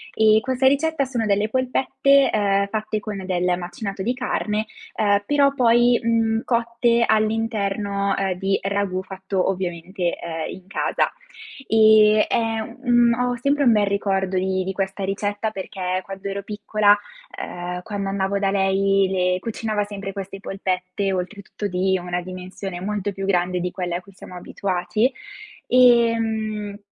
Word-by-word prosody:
E 220 0 +5
questa 260 +1 -1
ricetta 280 +2 +2
sono 240 -4 -2
delle 205 +1 +1
polpette, 265 +2 +2
ehm, 200 -1 +2
fatte 215 0 -2
con 205 -2 -6
del 180 -1 0
macinato 195 +3 -5
di 245 +6 -1
carne, 215 -4 -1 0.3
ehm, 205 -1 +2
però 280 -1 +3
poi, 240 -1 +4
mhmm, 225 -1 +1
cotte 235 0 +1
all'interno, 210 -2 0
ehm, 195 -1 0
di 195 0 +1
ragù 195 -2 -1
fatto 190 0 -2
ovviamente, 180 0 -3
ehm, 165 -1 -5
in 185 - -12
casa, - - 0 0.6
ehm, 215 -1 +6
è 225 -1 0 0.3
un 240 -1 +5
ho 245 0 0
sempre 280 +4 +1
un 240 - +6
bel 210 -2 +3
ricordo 195 -1 0
di 190 0 0
di 190 - -3
questa 195 +1 -3
ricetta 205 +2 -2
perché 185 -2 -3
quando 195 +1 -7
ero 200 0 -4
piccola, 210 0 +2 0.4
ehm, 180 0 -5
quando 200 -1 -4
andavo 195 0 -1
da 195 -1 +1
lei 195 0 +2
le 180 -1 +1
cucinava 215 0 -2
sempre 200 -1 -6
queste 195 -1 -7
polpette, 190 0 -2
oltretutto 200 +3 -4
di 190 0 0
una 180 0 -2
dimensione 185 0 -7
molto 205 +1 -2
più 195 0 -5
grande 180 -1 +1
di 180 +1 -2
quella 175 -1 -3
a - - -8
cui 195 +2 -17
siamo 180 - -12
abituati, 190 +6 -1 0.6
ehm, 225 -4 +3
200 Hz, 150 wpm, -22 LUFS, 190-225 Hz, 0.6 s, ehm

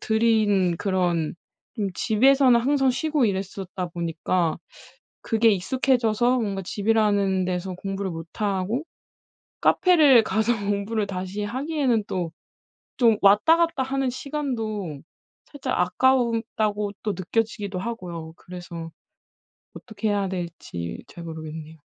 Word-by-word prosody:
들인 215 -5 +2
그런 175 -4 0 0.4
좀 210 -4 -1
집에서는 250 +4 +4
항상 270 +2 +2
쉬고 295 +1 0
이랬었다 190 -2 -3
보니까 170 0 -1 0.6
그게 225 0 +3
익숙해져서 240 +3 +2
뭔가 200 -4 -2
집이라는 205 -2 +1
데서 180 0 -3
공부를 195 +1 -4
못하고 195 - -2 0.8
카페를 305 - +5
가서 220 +2 +1
공부를 205 +1 -1
다시 190 +2 -4
하기에는 260 -1 0
또 175 -3 -3 0.7
좀 230 -4 +5
왔다 210 +12 +6
갔다 335 -5 +1
하는 265 0 -1
시간도 225 - -4 0.5
살짝 285 -2 -3
아까웠다고 225 -1 +1
또 210 - -1
느껴지기도 205 +1 -2
하고요. 175 -6 -6
그래서 175 -2 -8 0.8
어떻게 220 -2 -5
해야 200 -1 0
될지 170 - -6
잘 170 - -10
모르겠네요. 160 -1 -8
205 Hz, 270 characters per minute, -24 LUFS, 185-240 Hz, 0.8 s, 왔다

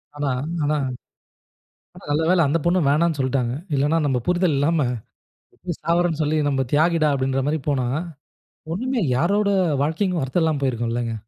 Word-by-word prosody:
ஆனா 145 -1 -2 0.3
ஆனா 150 +1 +1 1.2
ஆனா - - -14
நல்ல 150 +2 +1
வேள 185 -1 +4
அந்த 165 - +1
பொண்ணு 175 +2 +3
வேணானு 155 +2 +2
சொல்ட்டாங்க, 130 -2 0 0.2
இல்லனா 145 +4 +2
நம்ப 135 -3 +1
புரிதல் 180 -3 +2
இல்லாம,"எப்டி 140 -6 0 0.8
சாவுறேனு 170 0 +1
சொல்லி 155 +1 +1
நம்ம 135 -1 0
தியாகிடா", 160 0 +3
அப்டின்ற 135 0 0
மாரி 155 +2 0
போனா, 130 -4 0 0.9
இன்னுமே 250 +5 -1
யாரோட 200 +8 +2 0.3
வாழ்க்கைக்கும், 165 +2 0
அர்த்தம் 150 +7 0
இல்லாம 155 -3 0
போயிருக்கும்லங்க. 120 -2 -1
150 Hz, 140 wpm, -22 LUFS, 135-170 Hz, 1.2 s, வேள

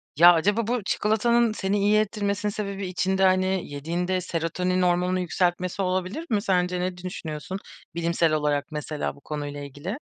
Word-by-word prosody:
Ya, 175 +4 +9
acaba 205 +7 +1
bu 240 -2 0
çikolatanın 225 +3 +2
seni 200 -1 0
iyi 205 +2 +4
ettirmesinin 205 -1 -1
sebebi 200 -2 -4
içinde, 190 +1 0
hani, 185 0 +3
yediğinde 175 +6 -1
serotonin 180 +2 -1
hormonunu 180 +1 +2
yükseltmesi 180 +1 0
olabilir 185 - -1
mi 210 -2 +1
sence 180 -3 +1
ne 180 0 -2
düşünüyorsun 180 0 -5 0.4
bilimsel 170 -1 +1
olarak 150 -2 +1
mesela 150 -1 -3
bu 140 - -18
konuyla 145 -1 -5
ilgili? 145 - -6
185 Hz, 150 wpm, -25 LUFS, 170-200 Hz, 0.4 s, Ya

